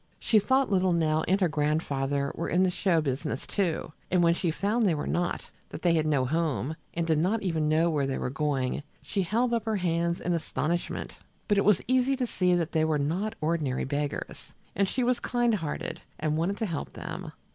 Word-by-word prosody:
She 220 - +3
thought 260 +4 +2
little 185 -2 +3
Nell 160 -2 +2
and 190 +3 +3
her 180 - +5
grandfather 145 -2 0
were - - -3
in 180 +2 +3
the 185 - +2
show 175 -3 +2
business, 145 +1 -3
too, 175 -6 -1 0.2
and 180 -1 +3
when 170 0 +5
she 170 0 -1
found 205 +8 0
they 185 -6 +3
were 145 - -3
not, 175 0 -2 0.2
that - - -8
they 175 -2 +4
had 155 -2 +2
no 140 -4 +2
home, 155 0 -1 0.2
and 170 0 0
did 160 -2 +2
not 205 +7 +1
even 160 -5 0
know 160 +2 +3
where 145 -3 +1
they 135 - -1
were 125 - -2
going, 140 -2 -1 0.2
she 200 - -1
held 235 +7 +1
up 230 -2 0
her 220 -1 0
hands 170 -2 0
in 175 - -1
astonishment. 170 +1 -2 0.3
But 205 -2 +3
it - - +1
was 205 -3 +4
easy 255 +2 +3
to 255 -1 -1
see 180 -6 +2
that 170 -2 -1
they 160 -1 +2
were 160 -1 +2
not 180 +10 -1
ordinary 155 -5 0
beggars, 145 +1 -4 0.2
and 200 +1 +2
she 255 - 0
was 245 0 +2
kind 240 -1 +1
hearted 165 -8 -3 0.2
and 155 -1 0
wanted 175 +6 0
to 225 - -1
help 170 -7 -4
them. - - -6
170 Hz, 215 wpm, -28 LUFS, 155-200 Hz, 0.3 s, her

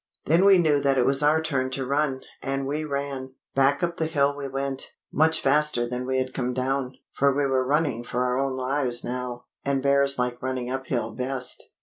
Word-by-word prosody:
Then 170 +5 +4
we 195 -1 +7
knew 155 -4 +3
that 140 -1 +1
it 125 - +3
was 135 +1 +3
our 150 +2 +4
turn 135 -5 0
to 135 - -2
run; 140 0 0 0.2
and 135 0 -2
we 150 +3 -2
ran. 140 -2 -4 0.2
Back 135 +4 +2
up 170 0 -1
the 160 - 0
hill 145 -3 +1
we 140 -1 -5
went, 135 0 -2 0.3
much 160 +2 +3
faster 145 -3 +2
than 125 +1 -4
we 130 0 0
had 130 0 -2
come 125 -1 -2
down; 130 0 -1 0.2
for 140 0 +3
we 140 +1 0
were 130 -1 +1
running 140 -3 0
for 125 +1 -2
our 125 +1 0
own 135 -1 -1
lives 130 -2 +1
now, 125 0 -5 0.2
and 135 -1 0
bears 140 0 +3
like 125 0 -2
running 130 -1 -3
uphill 130 -4 -2
best. 130 0 -3
135 Hz, 210 wpm, -25 LUFS, 130-145 Hz, 0.3 s, we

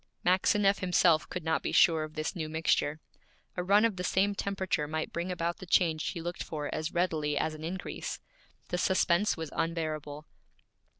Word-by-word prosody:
Maxineff 195 +2 +3
himself 175 -3 +3
could 180 - -5
not 160 0 0
be - - -3
sure 165 -5 +5
of 155 0 -8
this 155 +4 -3
new 160 -3 -4
mixture. 155 -1 +1 0.6
A 180 - -1
run 200 +4 +5
of 220 -5 0
the 180 - -3
same 195 +2 +2
temperature 190 -6 -2
might 155 +1 -3
bring 170 +2 -2
about 170 -1 -2
the 185 - -10
change 165 -3 +2
he 170 - -4
looked 175 +1 -5
for 150 -2 -4
as 155 +1 -3
readily 155 -4 0
as 155 +2 0
an 155 0 -9
increase. 180 +3 -5 0.5
The 180 - -1
suspense 185 +2 +2
was 160 -2 -5
unbearable. 155 -3 -3
170 Hz, 180 wpm, -30 LUFS, 155-185 Hz, 0.6 s, sure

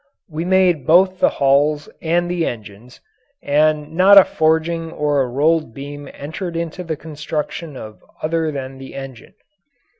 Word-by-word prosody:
We 165 -1 -5
made 180 -6 +2
both 185 +3 +4
the - - +4
hulls 145 +2 +1
and 170 +2 0
the 175 -1 -1
engines, 110 +1 -9 0.4
and 150 +1 +1
not 190 +4 +6
a 195 - +11
forging 160 +1 0
or 145 -2 0
a 130 - 0
rolled 150 0 0
beam 145 0 -8
entered 165 +4 -6
into 170 +2 -4
the 160 -3 -4
construction 150 0 -5
of 110 -2 -11 0.2
other 160 0 0
than 135 -2 -7
the 135 0 -10
engine. 135 -3 -10
155 Hz, 150 wpm, -19 LUFS, 140-165 Hz, 0.4 s, a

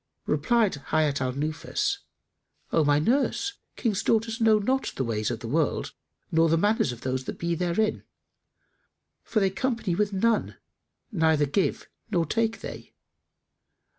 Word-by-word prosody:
Replied 230 -9 +2
Hayat 150 -3 +1
al 130 0 0
Nufus, 155 +4 -1 0.7
"O 160 - +3
my 145 0 +4
nurse, 270 - +1 0.2
King's 215 -5 0
daughters 225 +1 +1
know 220 -1 +6
not 260 +6 0
the 135 - -1
ways 110 -3 -1
of - - -4
the - - -5
world - - 0 0.4
nor 165 0 +4
the 165 - +3
manners 210 - +2
of 120 -1 -9
those 130 0 -2
that - - -5
be 170 0 -1
therein, 180 +5 0 1.2
for - - -19
that 195 - +3
they - - +3
company 230 -2 -1
with 205 +3 +1
none, 220 +3 +1 0.5
neither 160 -6 +3
give 160 +7 0
they - - -18 0.3
nor 170 - +2
take 225 +6 0
they. - - -9
180 Hz, 155 wpm, -26 LUFS, 150-225 Hz, 1.2 s, know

